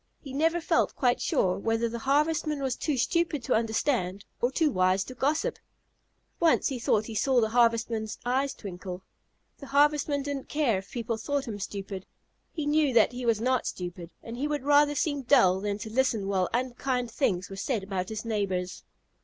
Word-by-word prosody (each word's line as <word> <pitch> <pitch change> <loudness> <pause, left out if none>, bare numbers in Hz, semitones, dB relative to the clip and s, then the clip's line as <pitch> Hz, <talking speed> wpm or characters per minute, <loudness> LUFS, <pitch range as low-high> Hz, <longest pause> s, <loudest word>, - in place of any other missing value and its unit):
He 270 -3 -10
never 325 +4 +2
felt 330 - +1
quite 250 -3 +1
sure 185 0 +1
whether 225 +2 0
the 235 +1 -5
Harvestman 300 +3 +1
was 260 -2 0
too 300 -4 -1
stupid 330 +1 0
to - - 0
understand 220 -4 0 0.2
or 245 - +3
too 305 +2 +2
wise 185 -1 +2
to 255 - -9
gossip. 300 - 0 0.8
Once 330 -2 +3
he 260 -3 -4
thought 215 -1 +1
he 225 - -7
saw 255 +4 +2
the 220 -2 +1
Harvestman's 230 -2 +1
eyes 265 +3 0
twinkle. 185 -2 -7 0.6
The 280 - -9
Harvestman 290 0 +2
didn't 280 -1 -5
care 270 -10 +1
if 190 -1 -13
people 230 0 -3
thought 280 +4 -2
him 210 -3 -5
stupid. 195 -1 -6 0.4
He 310 -3 -4
knew 295 -2 +2
that 225 - +5
he 245 0 -5
was 225 -2 +3
not 255 +2 +1
stupid, 175 -1 -6
and 230 +1 -7
he 285 +4 -1
would 295 -2 -2
rather 290 0 +4
seem 285 -1 0
dull 235 -9 +4
than 205 0 -2
to 220 0 -8
listen 235 -6 +1
while 190 -2 +1
unkind 250 0 -1
things 190 -8 -1
were - - -5
said 210 +1 -2
about 190 -1 -3
his 220 +1 -5
neighbors. 190 -5 -2
240 Hz, 185 wpm, -28 LUFS, 205-285 Hz, 0.8 s, that